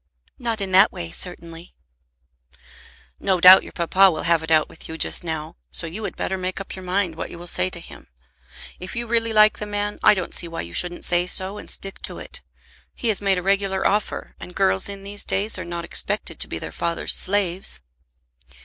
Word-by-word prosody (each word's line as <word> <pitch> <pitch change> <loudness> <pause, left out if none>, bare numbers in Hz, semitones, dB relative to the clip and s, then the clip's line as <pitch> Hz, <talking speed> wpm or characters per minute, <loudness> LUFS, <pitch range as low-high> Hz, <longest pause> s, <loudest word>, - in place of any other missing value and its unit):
"Not 230 -3 -2
in 195 -1 -3
that 190 +3 +7
way, 85 -1 -7
certainly." 170 - -5 1.4
"No 185 -2 +1
doubt 185 +2 +10
your - - -11
papa 185 +3 +4
will 160 -3 -3
have 165 -1 +3
it 160 - -7
out 155 -1 +4
with - - -14
you 160 - -6
just - - +1
now; 160 - -5
so 70 - -1
you 180 +7 -6
had - - -5
better 190 - -3
make 185 +1 -3
up 195 - -7
your 190 - -8
mind 185 -1 -1
what 160 - -6
you - - -9
will 175 - -10
say 95 - +2
to - - -6
him. - - -13 0.7
If 185 - -8
you 235 0 -2
really 230 0 +1
like 215 0 +5
the 210 - -4
man, 205 0 -3
I - - +6
don't 185 - -4
see 175 - +3
why 165 0 -5
you 85 0 -8
shouldn't 175 - -1
say 175 0 +2
so, 190 +3 -3
and - - -11
stick 195 0 -3
to - - -2
it. - - -9 0.5
He 235 - -2
has 210 - +2
made 195 -2 +2
a 180 - -3
regular 195 0 +1
offer, 210 +1 0
and 180 - -10
girls 95 - +3
in 200 -1 -8
these 205 +1 -4
days 205 +3 -1
are - - -4
not 170 0 -5
expected - - -4
to - - +1
be - - -5
their - - -6
father's 170 0 -2
slaves." 185 - 0
185 Hz, 220 wpm, -23 LUFS, 170-200 Hz, 1.4 s, doubt